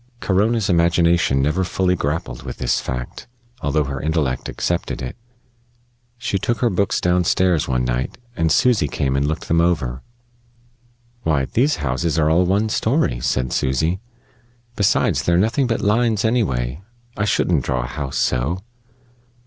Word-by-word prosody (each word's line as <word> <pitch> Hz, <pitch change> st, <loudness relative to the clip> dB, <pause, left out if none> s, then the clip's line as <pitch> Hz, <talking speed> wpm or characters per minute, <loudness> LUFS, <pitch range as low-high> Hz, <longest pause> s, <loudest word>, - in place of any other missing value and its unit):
Corona's 105 Hz, +2 st, +1 dB
imagination 85 Hz, -5 st, +3 dB
never 75 Hz, +7 st, +1 dB
fully 90 Hz, 0 st, +1 dB
grappled 70 Hz, -6 st, -3 dB
with -, -, -7 dB
this -, -, 0 dB
fact, 60 Hz, -1 st, -6 dB, 0.3 s
although 75 Hz, +1 st, +1 dB
her 70 Hz, -1 st, -4 dB
intellect 75 Hz, -5 st, -1 dB
accepted 85 Hz, -1 st, -2 dB
it. 65 Hz, -, -5 dB, 1.0 s
She 115 Hz, -5 st, -2 dB
took 120 Hz, +5 st, -1 dB
her 120 Hz, -2 st, +1 dB
books 100 Hz, +1 st, +1 dB
down 90 Hz, 0 st, +2 dB
stairs 90 Hz, -2 st, +2 dB
one 60 Hz, -1 st, 0 dB
night, 60 Hz, 0 st, -2 dB, 0.2 s
and 80 Hz, -1 st, +1 dB
Susy 110 Hz, -5 st, +3 dB
came 65 Hz, 0 st, -1 dB
and 70 Hz, +1 st, +1 dB
looked 80 Hz, -, -3 dB
them 85 Hz, +1 st, +3 dB
over. 70 Hz, -8 st, 0 dB, 1.2 s
"Why, 75 Hz, -, +1 dB
these 135 Hz, -, +1 dB
houses 80 Hz, +6 st, -1 dB
are 80 Hz, -1 st, +3 dB
all 90 Hz, +2 st, +3 dB
one 100 Hz, +4 st, +1 dB
story," 115 Hz, -, +1 dB
said 65 Hz, +1 st, -1 dB
Susy. 80 Hz, +8 st, 0 dB, 0.8 s
"Besides, 100 Hz, -, +2 dB
they're 85 Hz, 0 st, +2 dB
nothing 115 Hz, +8 st, +2 dB
but 115 Hz, -, -1 dB
lines, 110 Hz, 0 st, +2 dB
anyway. 75 Hz, -, 0 dB, 0.3 s
I 105 Hz, -, -1 dB
shouldn't 85 Hz, -8 st, +1 dB
draw 65 Hz, 0 st, -1 dB
a -, -, -4 dB
house 70 Hz, +1 st, -5 dB
so." 70 Hz, +12 st, 0 dB
85 Hz, 150 wpm, -20 LUFS, 65-100 Hz, 1.2 s, imagination